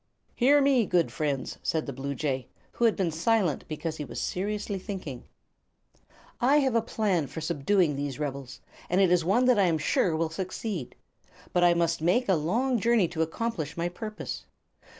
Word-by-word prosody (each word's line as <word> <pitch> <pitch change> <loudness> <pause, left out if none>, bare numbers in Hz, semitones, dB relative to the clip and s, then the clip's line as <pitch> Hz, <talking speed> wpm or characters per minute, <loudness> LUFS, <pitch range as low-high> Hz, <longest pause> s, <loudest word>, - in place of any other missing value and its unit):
"Hear 285 +4 +4
me, 265 -6 +3
good 170 -9 +2
friends," 140 +1 -2
said 160 -1 -1
the 140 - -5
bluejay, 135 -1 -3 0.2
who 235 - 0
had 225 - +4
been 180 -4 0
silent 175 -1 +1
because 160 +1 -4
he 150 - -4
was 135 - -6
seriously 205 +1 -2
thinking; 180 - -6 1.1
"I 265 +5 +4
have 270 -4 +2
a 230 - +3
plan 200 -9 0
for 150 - -7
subduing 160 +1 +1
these 140 -2 -3
rebels, 140 -3 -5 0.3
and 180 - +2
it 190 -3 +4
is 180 -2 +4
one 200 +9 +3
that 250 -4 +4
I 195 - +5
am 165 -2 +2
sure 160 +2 +1
will 160 0 -1
succeed. 185 - -4 0.6
But 175 - +3
I 175 -1 +5
must 165 -1 +1
make 185 +10 +2
a 195 - +4
long 225 - +1
journey 230 -4 +3
to 165 -2 -3
accomplish 160 -2 -3
my 170 +1 -1
purpose. 215 +4 -6
175 Hz, 180 wpm, -28 LUFS, 155-215 Hz, 1.1 s, I